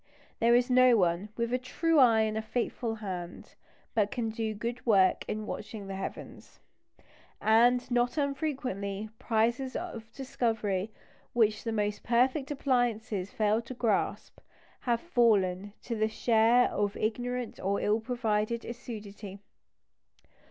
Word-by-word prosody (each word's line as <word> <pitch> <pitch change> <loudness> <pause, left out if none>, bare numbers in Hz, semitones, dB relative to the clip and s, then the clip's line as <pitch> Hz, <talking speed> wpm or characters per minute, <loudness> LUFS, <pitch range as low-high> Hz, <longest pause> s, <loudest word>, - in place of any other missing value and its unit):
There 235 +1 +5
is 245 0 +3
no 255 -1 +6
one 180 +1 +1
"with 235 +1 -1
a 250 - +2
true 315 +5 +1
eye 230 -4 +6
and 215 0 0
a 220 - -1
faithful 230 0 -2
hand" 185 -5 -7 0.4
but 210 -2 +2
can 225 -1 -2
do 220 -1 -3
good 235 +4 -4
work 195 -5 +4
in 215 0 -3
watching 210 -1 -6
the 195 - -6
heavens. 190 - -8 0.8
And 240 +3 +4
not 245 +3 +1
unfrequently, 260 -9 -2
prizes 235 +3 0
of 230 -11 -6
discovery 225 -6 -2 0.4
which 220 -3 +2
the 230 - -2
most 210 -1 -1
perfect 255 +4 +1
appliances 240 -8 0
failed 215 +2 0
to 255 - -7
grasp, 225 -5 -1 0.5
have 235 -1 +2
fallen 205 - +2
to 235 - -3
the 215 0 +1
share 230 +2 +3
of 205 0 -1
ignorant 245 +2 -3
or 200 +1 0
ill 210 +2 +1
provided 225 -1 -1
assiduity. 210 -5 -8
225 Hz, 135 wpm, -29 LUFS, 210-245 Hz, 0.8 s, no